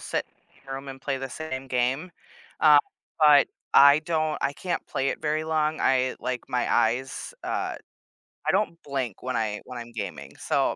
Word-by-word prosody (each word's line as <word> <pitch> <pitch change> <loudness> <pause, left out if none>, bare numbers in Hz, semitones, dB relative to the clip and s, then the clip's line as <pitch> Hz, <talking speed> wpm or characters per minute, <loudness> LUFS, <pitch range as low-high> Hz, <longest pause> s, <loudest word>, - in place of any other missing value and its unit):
sit - - -2 0.4
in 135 - -11
a - - -2
room 135 +1 -7
and 135 0 -8
play 135 0 -2
the 135 0 -5
same 135 -2 -5
game, 130 +7 -1 0.5
uh, 150 -2 +8 0.4
but 150 -2 +6 0.3
I 140 +1 +8
don't 155 -1 -1
I 140 - 0
can't 175 +3 -3
play 135 -1 -1
it - - -3
very 155 0 0
long. 155 -1 0
I 130 -1 +2
like, 125 -1 -4
my 125 - 0
eyes, 130 - 0
uh, - - -2 0.7
I - - +5
don't 195 -3 0
blink 130 -7 -4
when 130 -1 -1
I 105 -2 -2
when 125 -1 -8
I'm 120 0 -9
gaming, 90 - -6
so, - - +1
135 Hz, 185 wpm, -26 LUFS, 125-155 Hz, 0.7 s, uh